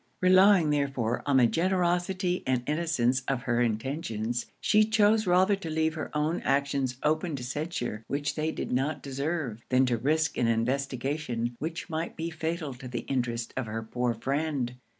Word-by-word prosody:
Relying 185 -3 +6
therefore 135 -5 0
on 140 -2 +4
the 125 - +6
generosity 180 - +1
and 130 -2 +1
innocence 145 -5 +1
of 130 -3 -1
her 120 -1 +1
intentions, 115 -1 -2
she 215 0 +4
chose 215 -1 +3
rather 185 +3 +4
to 195 -4 -7
leave 160 0 +1
her 155 - -5
own 155 +3 0
actions 140 -2 0
open 155 +1 +1
to 130 - -6
censure 125 -5 -3
which 145 0 -1
they 155 +1 -1
did - - -5
not 140 +4 -1
deserve, 140 -4 -3
than 130 +1 +4
to 120 -2 +1
risk 150 +6 +1
an 120 - +2
investigation 125 +1 -1
which 165 +3 -4
might 165 0 -3
be 165 0 -3
fatal 160 -2 -3
to 125 +1 -10
the 120 -1 -4
interest 120 -3 -2
of 130 -3 -2
her 110 +1 -4
poor 120 +1 -1
friend. 135 0 -1
140 Hz, 170 wpm, -28 LUFS, 120-165 Hz, -, Relying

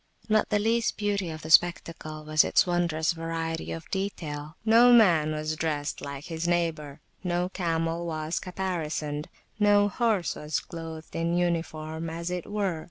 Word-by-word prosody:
Not 215 -1 +2
the 210 - +2
least 225 +2 +1
beauty 205 -4 -1
of 155 0 -7
the 155 - -5
spectacle 165 -2 +2
was 155 0 +4
its - - +3
wondrous 175 -3 +1
variety 165 -1 -3
of 165 -1 -6
detail: 155 -6 -4
no 230 +2 +7
man 175 -10 +5
was 155 0 -2
dressed 150 -2 -2
like 140 0 -6
his 165 0 -3
neighbour, 160 -4 -1 0.2
no 180 0 0
camel 165 -2 -1
was 155 0 -2
caparisoned, 160 -5 -3 0.3
no 205 0 +5
horse 215 -5 +1
was 150 +1 -2
[p.66] - - -16
clothed 165 -2 -8
in 170 +1 0
uniform, 165 -2 -2
as 170 +2 -4
it 180 -1 -4
were. 195 -6 -1
165 Hz, 160 wpm, -27 LUFS, 155-185 Hz, 0.3 s, no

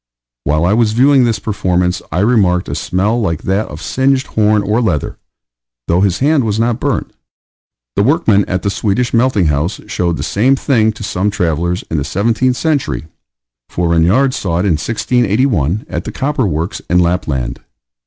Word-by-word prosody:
While 75 +3 +1
I 95 - +2
was 110 -1 +2
viewing 130 +2 +4
this 115 -2 0
performance, 90 -4 -1
I 90 - 0
remarked 100 -6 +2
a - - -4
smell 105 +6 0
like 85 -7 -2
that 100 +3 0
of 75 +2 -9
singed 135 0 +1
horn 105 -1 +1
or 105 +4 +1
leather, 90 - -2 0.7
though 85 +2 +2
his 95 -3 +1
hand 145 0 +2
was 110 -1 -1
not 115 +1 0
burnt. - - -2 0.8
The - - +2
workmen 115 - +3
at 90 -1 -3
the 100 - 0
Swedish 115 +5 -1
melting 115 -5 +2
house 75 +5 -1
showed 85 -2 -1
the - - -4
same 125 +7 +2
thing 115 -5 +1
to 105 - -9
some 100 0 -1
travellers 85 -2 -1
in 80 - 0
the - - -2
seventeenth 115 - 0
century; 105 - -1 0.6
for 85 -1 -1
Regnard 95 +12 +3
saw 95 -10 -3
it 90 - 0
in 100 - +2
1681, 110 - 0
at - - -5
the - - -5
copper 135 -4 -1
works 80 +1 -3
in 90 - +3
Lapland. 85 -8 -1
100 Hz, 175 wpm, -15 LUFS, 90-120 Hz, 0.8 s, viewing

